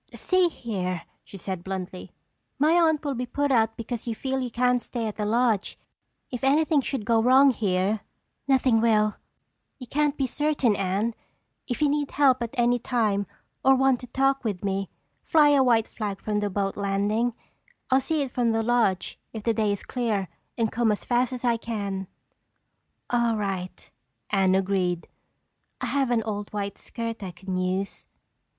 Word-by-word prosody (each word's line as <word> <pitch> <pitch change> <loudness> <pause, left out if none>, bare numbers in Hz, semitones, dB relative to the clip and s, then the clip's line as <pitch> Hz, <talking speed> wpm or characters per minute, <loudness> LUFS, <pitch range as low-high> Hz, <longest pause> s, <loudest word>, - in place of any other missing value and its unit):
"See 370 -1 +2
here," 185 - -3 0.2
she 195 - -11
said 185 -1 -5
bluntly, 185 -1 -6 0.5
"my 300 +3 +3
aunt 320 -3 +3
will 285 - 0
be 250 0 -3
put 285 +3 0
out 225 -3 +2
because 230 +1 -5
you 230 - -2
feel 265 +3 -2
you 255 -1 -2
can't 250 +1 +2
stay 235 -2 -4
at 215 - -3
the 210 -1 -1
lodge. 225 -2 +1 0.5
If 250 -1 -5
anything 300 +2 +3
should 260 -4 -3
go 225 -1 +3
wrong 265 +3 +6
here—" 200 -2 0 0.5
"Nothing 260 -4 +3
will." 215 -2 +3 0.6
"You 255 - -9
can't 295 +3 0
be 270 - +1
certain, 280 -4 +1
Anne. 200 +4 0 0.5
If 250 +4 -1
you - - +5
need 290 0 0
help 270 -3 +3
at 235 +3 -4
any 240 0 +3
time 215 -5 0 0.4
or 270 0 +6
want 265 -1 +3
to 250 - -9
talk 270 +2 +1
with 205 -5 -3
me, 195 0 -1 0.3
fly 300 -2 +4
a 285 -2 +5
white 230 -3 +3
flag 205 -3 -4
from 210 -1 -1
the 205 0 -1
boat 195 0 -1
landing. 205 +4 0 0.6
I'll 265 +1 +5
see 300 +2 0
it 265 - -6
from 235 -2 +1
the 225 0 +1
lodge 225 -6 +1
if 220 -2 -6
the 230 - +2
day 215 -2 +1
is 200 - -3
clear 220 -7 -1 0.3
and 225 -2 +1
come 235 -2 +2
as 210 - -2
fast 245 0 +1
as 250 -1 -4
I 235 -1 +3
can." 200 -4 -4 1.0
"All 235 -2 +2
right," 195 -3 -4 0.4
Anne 190 -2 +3
agreed, 185 -3 0 0.7
"I - - -3
have 275 -3 0
an 235 -2 +2
old 205 -1 -4
white 200 -1 -4
skirt 230 -2 -5
I 190 - -4
can 185 +1 -6
use." 185 +2 -2
230 Hz, 180 wpm, -26 LUFS, 200-260 Hz, 1.0 s, wrong